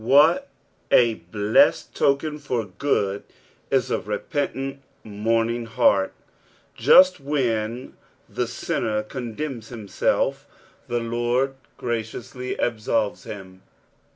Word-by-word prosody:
What 155 - +5 0.4
a 120 -2 +5
blessed 105 +4 +2
token 150 +2 +1
for 125 -6 -2
good 100 -1 -1 0.5
is - - +1
a - - +1
repentant, 135 +5 -3 0.2
mourning 115 +2 0
heart! 100 -3 +3 0.6
Just 185 0 +6
when 125 -4 -1 0.3
the - - -2
sinner 105 -1 -2
condemns 120 +1 -5
himself, 110 -5 -1 0.4
the 120 0 -1
Lord 120 +3 0 0.2
graciously 120 +2 -4
absolves 110 -2 -1
him. 95 -3 -9
115 Hz, 95 wpm, -24 LUFS, 110-135 Hz, 0.6 s, Just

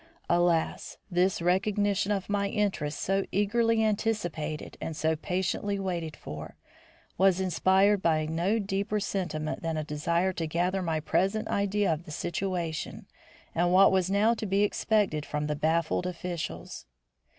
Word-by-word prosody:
Alas! 175 -1 +1
this 180 0 +1
recognition 200 +2 +1
of 195 -2 -1
my 205 -1 0
interest, 190 -9 -1
so 195 +1 +1
eagerly 225 +3 +2
anticipated 185 -8 -2
and 160 - -4
so 160 +1 +1
patiently 190 +4 -1
waited 175 -5 -3
for, 75 +1 -8 0.6
was 190 -1 +4
inspired 190 +2 +3
by 155 -3 +2
no 170 +7 0
deeper 200 0 -1
sentiment 175 -6 -3
than 165 -1 -2
a 155 - -1
desire 170 +5 0
to 165 -2 -3
gather 180 +4 0
my 165 -3 -1
present 195 +7 0
idea 200 -2 +1
of 160 +2 -6
the - - -9
situation 175 -1 -3 0.5
and 175 +1 +2
what 190 +2 +7
was 190 -1 +2
now 205 +4 +3
to 220 -2 -4
be 195 +2 +2
expected 205 -7 +1
from 150 0 -3
the 150 0 -1
baffled 165 +3 0
officials. 175 - -5
185 Hz, 145 wpm, -28 LUFS, 160-200 Hz, 0.6 s, what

